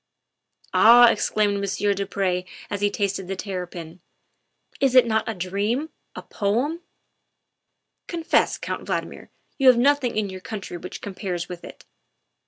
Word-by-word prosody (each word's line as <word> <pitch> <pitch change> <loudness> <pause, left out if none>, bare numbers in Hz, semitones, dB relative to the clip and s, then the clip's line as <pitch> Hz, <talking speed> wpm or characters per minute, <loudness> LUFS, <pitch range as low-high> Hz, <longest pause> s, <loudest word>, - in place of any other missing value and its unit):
"Ah," 240 +1 +8
exclaimed 205 -1 0
Monsieur 200 +1 0
du 200 0 -3
Pre 185 -2 -1 0.3
as 205 -1 -3
he 205 - +3
tasted 200 -2 -2
the 195 - -3
terrapin, 180 -3 -6 0.3
' - - -50
' - - -27
is 270 -2 +2
it 255 - +8
not 220 -1 0
a 225 - -3
dream 205 - -2 0.2
a - - -7
poem? 245 - -1 1.3
Confess, 335 -2 +1
Count - - -5
Valdmir, - - -4 0.3
you 270 - +3
have 250 -2 +8
nothing 260 -2 +2
in 215 -1 0
your 190 -1 -8
country 195 -3 -7
which 180 +1 -8
com 200 - -6
pares 180 -3 -4
with 175 -1 -8
it." - - -12
205 Hz, 160 wpm, -24 LUFS, 185-240 Hz, 1.3 s, Ah